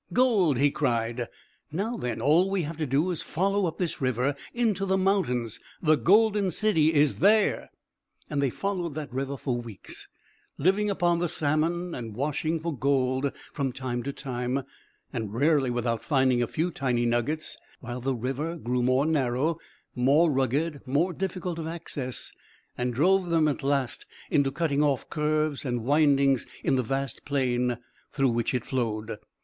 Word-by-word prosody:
"Gold!" 210 - +3
he 140 +2 +3
cried. 120 -4 -1 0.4
"Now 205 +9 -2
then, 125 - -3
all 165 +7 +4
we 195 -2 0
have 155 +1 -5
to 155 -2 -2
do 145 +8 +1
is 170 - -3
to - - -5
follow 195 +3 +1
up 160 - -5
this 175 -5 -2
river 130 +2 +1 0.2
into 225 -5 0
the 190 0 +2
mountains. 125 - 0 0.2
The 155 -2 +4
golden 205 +3 +4
city 175 -6 +3
is 150 -2 +3
there." 210 +3 +3 0.6
And 145 -2 -1
they 140 - +2
followed 175 0 -3
that 150 -5 -6
river 135 +1 -2
for 125 -2 -2
weeks, 115 -5 -9 0.5
living 195 +7 +2
upon 175 -3 +2
the 175 -1 0
salmon, 165 +4 0
and 115 -3 -6
washing 150 +5 -1
for 165 -1 -3
gold 130 0 +1 0.2
from 135 -2 -1
time 125 -1 -3
to 140 +4 -3
time, 130 -1 -3 0.5
and 110 -4 -4
rarely 140 0 +3
without 120 -2 -1
finding 130 -4 +2
a 120 - +1
few 170 +8 -1
tiny 125 -5 0
nuggets, 120 +7 0 0.2
while 125 0 -6
the 135 +1 0
river 135 +8 -3
grew 125 -5 -1
more 130 +3 +3
narrow, 150 +1 +1 0.3
more 140 +7 +4
rugged, 140 +3 0
more 160 +8 +1
difficult 180 -1 -3
of 160 - -4
access, 155 -6 -5 0.4
and 125 0 -1
drove 185 +5 +3
them 165 -2 +3
at 145 - -1
last 135 -5 -1 0.2
into 140 -2 +3
cutting 150 -2 0
off 140 -4 0
curves 155 -1 0
and 120 -4 -2
windings 140 -2 +3 0.2
in - - +2
the 130 - +2
vast 135 +1 -3
plain 125 -3 0 0.3
through 135 -2 +2
which 120 +1 0
it 125 - -2
flowed. 110 -4 -2
140 Hz, 165 wpm, -27 LUFS, 125-165 Hz, 0.6 s, all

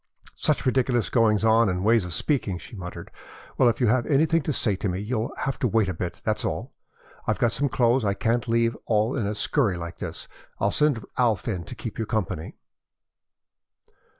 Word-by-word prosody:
"Such - - 0
ridiculous 125 -3 +1
goings 110 -3 +3
on 110 -1 +5
and 90 0 -2
ways 110 -3 +4
of 90 - -5
speaking!" 115 - 0
she 110 - -11
muttered. 90 -3 -8 0.4
"Well, 125 - +5
if 115 - -2
you've 120 0 +2
anything 160 +3 +3
to 150 - -2
say 110 -6 0
to 100 - -2
me 90 +1 -2
you'll 110 +2 -2
have 135 - -2
to 125 - +2
wait 110 -3 +2
a - - -1
bit, 85 +1 -5
that's - - 0
all. - - -3 0.5
I've - - +1
got 120 - +2
some 140 +4 0
clothes 120 0 +2
I 100 -2 +1
can't 115 +2 0
leave 115 0 +2
all 110 +2 +2
in 115 -7 -1
a 105 - -2
scurry 105 -4 +1
like 85 0 -7
this. - - -6 0.3
I'll - - +2
send 145 -7 +3
Alf 115 -5 +2
in 90 -7 -2
to - - -8
keep 120 -9 -7
you 110 - -2
company." 95 -8 -3
115 Hz, 200 wpm, -25 LUFS, 100-125 Hz, 0.5 s, on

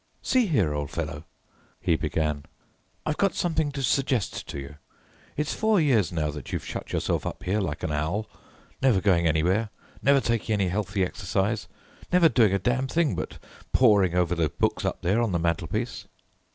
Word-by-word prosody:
"See 255 -4 +3
here, 105 - +2
old 75 -1 -3
fellow," 75 +2 -4 0.5
he - - +2
began, 75 -2 -1 0.6
"I've 150 - -1
got 195 -1 +2
something 160 -4 0
to 140 -1 -3
suggest 130 -4 0
to - - -6
you. 70 +2 -9 0.6
It's 150 +1 -1
four 220 -2 +2
years 120 - +3
now 80 -3 -1
that 75 -3 -8
you've - - -3
shut - - -6
yourself - - 0
up - - -5
here 100 +3 0
like 80 -7 -3
an - - -1
owl, 80 +9 -1 0.5
never 130 -7 +4
going 90 -4 +3
anywhere, 90 +8 +2 0.3
never 140 0 +5
taking 115 -3 0
any 100 -3 +1
healthy 100 0 0
exercise, 100 +3 -1 0.4
never 180 -2 +6
doing 110 -5 +4
a 100 - +2
damn 125 +6 0
thing 160 0 +1
but - - -5 0.4
poring 100 -8 +4
over 90 0 +2
those 80 -3 +1
books - - 0
up - - -2
there 100 +7 +2
on 115 -5 0
the - - +2
mantelpiece." 85 +8 -2
100 Hz, 180 wpm, -26 LUFS, 85-130 Hz, 0.6 s, never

